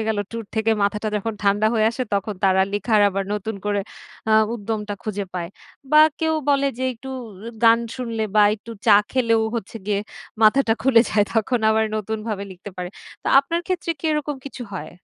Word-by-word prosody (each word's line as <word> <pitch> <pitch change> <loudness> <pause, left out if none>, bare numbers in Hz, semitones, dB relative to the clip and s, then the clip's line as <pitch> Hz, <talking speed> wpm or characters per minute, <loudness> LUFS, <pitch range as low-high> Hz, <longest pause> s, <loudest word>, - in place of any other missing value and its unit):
গেল, 220 - 0
ট্যুর 230 0 -5
থেকে 220 0 +1
মাথাটা 210 +2 0
যখন 225 +2 -2
ঠান্ডা 205 +1 +3
হয়ে 220 -1 +3
আসে, 255 - -3
তখন 200 +1 -1
তারা 190 0 +4
লিখার 210 +1 +2
আবার 195 0 -2
নতুন 210 +1 -4
করে 205 -1 0 0.5
আ - - +4 0.2
উদ্যমটা 210 -1 -4
খুঁজে 205 -2 -3
পায়। 170 -2 -3 0.4
বা 305 - +8 0.2
কেউ 320 0 +1
বলে 280 -1 +3
যে, 260 - -1
একটু 265 +3 -10 0.5
গান 230 0 +7 0.2
শুনলে 230 -3 -3
বা 210 - +7
একটু 225 +2 -12 0.2
চা 210 - +8 0.2
খেলেও 230 -3 +2
হচ্ছে 225 0 -6
গিয়ে, 205 -1 +1 0.4
মাথাটা 225 +2 +5
খুলে 255 -3 +6
যায়। 205 -1 +3
তখন 235 +2 +1
আবার, 220 0 +3
নতুনভাবে 215 -1 -3
লিখতে 185 +3 -10
পারে। 180 -1 -4 0.3
তো, - - -10
আপনার 330 +5 0
ক্ষেত্রে 365 -2 -2
কি, - - -17
এরকম 300 -1 -2
কিছু 270 -2 -7
হয়? 155 -5 -6
220 Hz, 185 wpm, -22 LUFS, 205-240 Hz, 0.5 s, বা